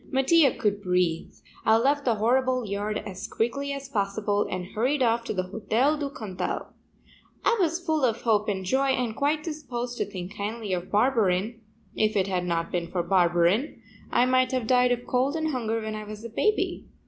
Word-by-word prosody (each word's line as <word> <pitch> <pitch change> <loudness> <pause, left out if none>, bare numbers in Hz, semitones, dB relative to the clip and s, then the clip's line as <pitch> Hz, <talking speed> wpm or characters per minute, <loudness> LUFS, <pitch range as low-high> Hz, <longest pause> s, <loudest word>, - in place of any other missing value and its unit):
Mattia 275 +3 +4
could 205 -2 -1
breathe. 180 -3 0 0.3
I 220 0 +5
left 280 +4 +1
the 235 -3 +3
horrible 255 +3 +1
yard 205 +1 -2
as 190 -2 -6
quickly 275 +5 -2
as 275 -1 -5
possible 205 -3 0
and 180 -1 -3
hurried 260 +5 +1
off 230 0 +2
to - - -2
the 185 - 0
Hotel 220 +9 +1
du 290 -2 -3
Cantal. 210 -9 -4 0.8
I - - +4
was 335 -1 +1
full 315 -4 -1
of 235 -2 +1
hope 210 -3 +2
and 190 -2 -2
joy 265 +7 +2
and 250 -4 0
quite 295 +3 0
disposed 250 -7 -5
to - - +1
think 190 -1 -7
kindly 210 0 -3
of 180 0 -3
Barberin; 220 -1 +1 0.3
if 215 0 +1
it 195 -2 +3
had 185 -2 -1
not 170 -1 -1
been 175 -1 -1
for 175 0 -1
Barberin, 175 - +2 0.3
I 245 - +4
might 255 0 +2
have 255 -3 0
died 250 +1 +4
of 245 0 -1
cold 260 +4 +1
and 315 -1 -1
hunger 230 -5 -1
when 220 -1 -4
I 215 0 -5
was 210 +1 -9
a - - -5
baby. 425 - 0
225 Hz, 195 wpm, -26 LUFS, 200-260 Hz, 0.8 s, I